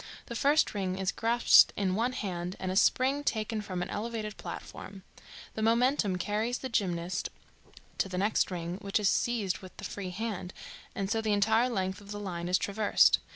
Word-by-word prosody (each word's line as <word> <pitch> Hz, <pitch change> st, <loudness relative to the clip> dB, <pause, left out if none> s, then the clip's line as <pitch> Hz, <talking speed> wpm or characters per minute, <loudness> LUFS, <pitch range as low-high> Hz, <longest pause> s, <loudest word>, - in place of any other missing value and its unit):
The 235 Hz, -, -7 dB
first 290 Hz, +6 st, +3 dB
ring 190 Hz, -2 st, -2 dB
is 190 Hz, 0 st, 0 dB
grasped 235 Hz, +1 st, +5 dB
in 190 Hz, -2 st, 0 dB
one 235 Hz, +6 st, 0 dB
hand 180 Hz, -5 st, -4 dB
and 185 Hz, -1 st, -2 dB
a -, -, -3 dB
spring 265 Hz, +7 st, +3 dB
taken 220 Hz, -3 st, -1 dB
from 185 Hz, -3 st, -3 dB
an -, -, -7 dB
elevated 215 Hz, -1 st, -4 dB
platform. 195 Hz, -1 st, -8 dB, 0.5 s
The 220 Hz, -, -4 dB
momentum 230 Hz, -3 st, +2 dB
carries 215 Hz, +6 st, -1 dB
the 260 Hz, -, -6 dB
gymnast 180 Hz, -5 st, -1 dB, 0.7 s
to 195 Hz, -, +1 dB
the 180 Hz, -, -4 dB
next 205 Hz, +3 st, +2 dB
ring, 175 Hz, 0 st, -4 dB
which 200 Hz, +1 st, 0 dB
is 205 Hz, -2 st, +3 dB
seized 220 Hz, -6 st, 0 dB
with 185 Hz, -1 st, -13 dB
the -, -, -10 dB
free 195 Hz, -2 st, -5 dB
hand, 190 Hz, -2 st, -5 dB, 0.4 s
and 195 Hz, -, -2 dB
so 225 Hz, -1 st, +1 dB
the 215 Hz, -1 st, +1 dB
entire 220 Hz, +4 st, +3 dB
length 190 Hz, -3 st, -2 dB
of 200 Hz, -, -15 dB
the 205 Hz, 0 st, -5 dB
line 175 Hz, -4 st, -4 dB
is 185 Hz, -, +4 dB
traversed. 205 Hz, +1 st, +3 dB
205 Hz, 190 wpm, -30 LUFS, 185-225 Hz, 0.7 s, grasped